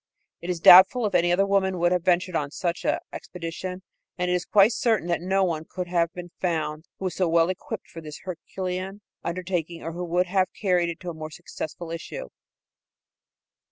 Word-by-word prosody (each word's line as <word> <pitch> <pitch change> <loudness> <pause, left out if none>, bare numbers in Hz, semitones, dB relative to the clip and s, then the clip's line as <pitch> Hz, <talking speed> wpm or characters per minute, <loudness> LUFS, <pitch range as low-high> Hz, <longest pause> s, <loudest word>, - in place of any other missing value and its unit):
It 170 - -6
is 175 -2 -1
doubtful 190 +8 +8
if 205 - -1
any 175 0 +3
other 190 +3 +3
woman 190 -2 +1
would 175 0 +2
have 180 -2 +1
ventured 180 0 +2
on 145 -3 0
such 170 +3 -3
an - - +2 0.2
expedition, 180 +2 -6 0.3
and 180 0 0
it - - +2
is 180 0 0
quite 210 +2 +5
certain 220 -8 +1
that 170 - 0
no 190 +2 +1
other 190 - +3
one 160 -1 -3
could 180 -1 -4
have 170 -1 +1
been 175 -1 -8
found 160 -3 -2
that - - -62
was 185 - -1
so 185 -3 0
well 165 +1 +4
equipped 225 +3 -6
for 165 - -10
this 150 -2 -9
herculean 185 +2 -5 0.2
undertaking 175 -1 -3
or 165 - -4
who 175 +2 -5
would 175 +2 +1
have 185 +1 +2
carried 180 -4 +2
it 170 - -6
to 180 -1 -4
a - - -8
more 155 -1 -7
successful 165 +2 -7
issue. 330 - -6
180 Hz, 205 wpm, -25 LUFS, 170-190 Hz, 0.3 s, doubtful